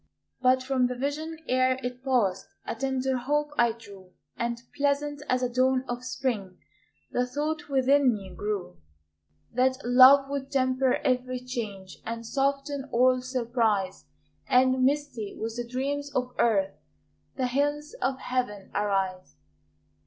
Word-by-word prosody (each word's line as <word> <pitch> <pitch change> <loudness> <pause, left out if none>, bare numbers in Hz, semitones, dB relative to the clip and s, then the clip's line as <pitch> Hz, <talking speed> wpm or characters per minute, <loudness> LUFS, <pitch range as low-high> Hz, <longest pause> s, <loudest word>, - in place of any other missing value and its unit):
But 255 0 +4
from 255 -1 +2
the 250 - -4
vision 300 +5 -3
ere 255 0 +2
it 250 +1 -5
passed 210 -8 +1 0.2
A - - -3
tender 265 +1 -1
hope 295 +4 0
I 235 -3 +4
drew, 200 -5 -14 0.2
And, 235 0 -2 0.2
pleasant 290 0 0
as 255 0 +1
a - - +3
dawn 255 +1 +2
of 245 0 -4
spring, 220 -9 -3 0.5
The 250 0 0
thought 300 +4 -3
within 270 0 +4
me 195 -4 -6
grew, 200 - -4 0.8
That 260 +2 +2
love 260 +3 +8
would 275 -1 -4
temper 260 -1 +2
every 255 0 0
change, 215 -7 -6
And 230 +1 -5
soften 275 +2 -1
all 255 +1 +4
surprise, 230 -6 -1 0.4
And, 255 0 +4
misty 270 -6 -1
with 225 0 -3
the 240 -1 -4
dreams 285 +3 -2
of 250 0 -1
earth, 195 -4 +2 0.6
The 260 - 0
hills 290 - -1
of 265 0 0
Heaven 245 -7 -3
arise. 195 -3 -1
255 Hz, 140 wpm, -27 LUFS, 230-270 Hz, 0.8 s, love